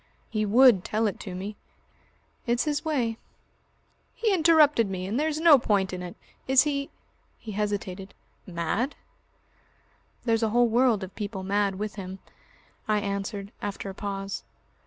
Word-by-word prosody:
"He 215 Hz, -1 st, 0 dB
would 235 Hz, -3 st, +6 dB
tell 220 Hz, +1 st, 0 dB
it 205 Hz, -, -1 dB
to 185 Hz, -3 st, -7 dB
me." 200 Hz, +3 st, -6 dB, 0.9 s
"It's 240 Hz, +1 st, +2 dB
his 295 Hz, -1 st, -1 dB
way." 245 Hz, -8 st, -1 dB, 1.0 s
"He 440 Hz, -3 st, +1 dB
interrupted 310 Hz, -, +5 dB
me. 185 Hz, -1 st, -4 dB
And 215 Hz, +7 st, -1 dB
there's 310 Hz, 0 st, 0 dB
no 320 Hz, -4 st, +7 dB
point 195 Hz, -5 st, +1 dB
in 180 Hz, -, -4 dB
it. 180 Hz, +2 st, -7 dB, 0.3 s
Is 265 Hz, 0 st, +6 dB
he 280 Hz, -2 st, -2 dB, 0.2 s
" -, -, -40 dB
he 220 Hz, -, -5 dB
hesitated, 200 Hz, -2 st, -3 dB, 0.3 s
"mad?" 180 Hz, -, -2 dB, 1.3 s
"There's 225 Hz, -1 st, +2 dB
a 225 Hz, -, +2 dB
whole 240 Hz, +2 st, +4 dB
world 235 Hz, -3 st, +3 dB
of 190 Hz, -, -8 dB
people 200 Hz, -2 st, -5 dB
mad 200 Hz, 0 st, +1 dB
with 210 Hz, +2 st, -5 dB
him," 190 Hz, -1 st, -6 dB, 0.7 s
I 215 Hz, -1 st, +2 dB
answered 200 Hz, 0 st, -4 dB
after 200 Hz, -1 st, -4 dB
a -, -, -10 dB
pause. 195 Hz, 0 st, -5 dB
210 Hz, 155 wpm, -27 LUFS, 195-245 Hz, 1.3 s, no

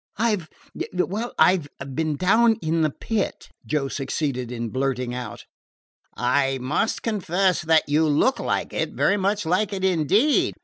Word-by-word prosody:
"I 225 Hz, 0 st, +2 dB
've 170 Hz, -6 st, -9 dB, 0.5 s
well, 205 Hz, +6 st, -1 dB
I 185 Hz, -, +5 dB
've 140 Hz, -4 st, -9 dB
been 155 Hz, -1 st, 0 dB
down 225 Hz, +8 st, +4 dB
in 165 Hz, -3 st, -1 dB
the 155 Hz, -, +3 dB
Pit," 210 Hz, +7 st, -3 dB, 0.2 s
Joe 150 Hz, -3 st, 0 dB
succeeded 135 Hz, -2 st, -3 dB
in 120 Hz, -1 st, -4 dB
blurting 130 Hz, -1 st, -2 dB
out. 125 Hz, 0 st, -7 dB, 0.7 s
"I 135 Hz, +2 st, +1 dB
must 130 Hz, -, -1 dB
confess 190 Hz, -4 st, +1 dB
that 160 Hz, -1 st, +3 dB
you 155 Hz, +2 st, +2 dB
look 155 Hz, -, +2 dB
like -, -, -2 dB
it -, -, -2 dB
very 205 Hz, -, +2 dB
much 200 Hz, 0 st, 0 dB
like 185 Hz, +5 st, +1 dB
it 190 Hz, -1 st, -2 dB
indeed." 190 Hz, -, +2 dB
Mr. -, -, -33 dB
160 Hz, 165 wpm, -23 LUFS, 135-200 Hz, 0.7 s, I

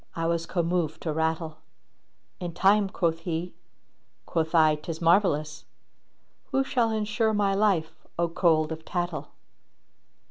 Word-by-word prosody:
I 165 Hz, -1 st, -2 dB
was 165 Hz, 0 st, -1 dB
commoved 170 Hz, -3 st, -1 dB
to 160 Hz, -, -2 dB
rattle: 160 Hz, 0 st, -1 dB, 0.8 s
'In 175 Hz, -3 st, -5 dB
time,' 200 Hz, +1 st, +4 dB
quoth 165 Hz, -4 st, 0 dB
he: 170 Hz, +1 st, -4 dB, 0.7 s
quoth 160 Hz, 0 st, -1 dB
I 155 Hz, -2 st, +6 dB
' -, -, -9 dB
'Tis 160 Hz, 0 st, -6 dB
marvellous! 160 Hz, -4 st, +2 dB, 0.4 s
* -, -, -44 dB
Who 270 Hz, -1 st, +2 dB
shall 245 Hz, -4 st, +1 dB
ensure 220 Hz, 0 st, 0 dB
my 200 Hz, -1 st, +2 dB
life, 195 Hz, -6 st, 0 dB
O 170 Hz, 0 st, +1 dB
cold 160 Hz, -2 st, +2 dB
of 160 Hz, 0 st, -6 dB
tattle!'" 175 Hz, -1 st, -3 dB
170 Hz, 140 wpm, -27 LUFS, 160-195 Hz, 0.8 s, I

